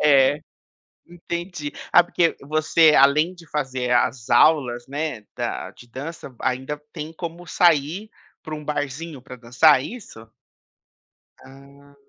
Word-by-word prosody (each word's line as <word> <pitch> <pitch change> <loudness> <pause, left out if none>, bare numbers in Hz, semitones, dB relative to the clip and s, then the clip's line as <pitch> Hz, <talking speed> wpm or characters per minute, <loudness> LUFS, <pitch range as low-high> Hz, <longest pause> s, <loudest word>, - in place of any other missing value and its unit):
é 145 0 +4 0.7
entendi. 170 -2 -6 0.2
Ah 175 - +7
porque 170 -1 +1
você 155 +2 +3
além 150 +6 +4
de 165 -3 -16
fazer 130 -4 -2
as 120 -1 +1
aulas, 125 -6 +3
né, 145 -5 -4
da - - -4
de 120 - -17
dança, 140 +3 -8
ainda 130 +3 -2
tem 155 0 -6
como 170 +1 -7
sair 170 +5 +2 0.3
para 155 - -6
um 150 - -8
barzinho, 145 0 -4
para 125 0 -10
dançar 125 +4 +4
é - - -5
isso? 115 - -10 1.1
Ah. 140 +1 -17
145 Hz, 130 wpm, -22 LUFS, 130-165 Hz, 1.1 s, Ah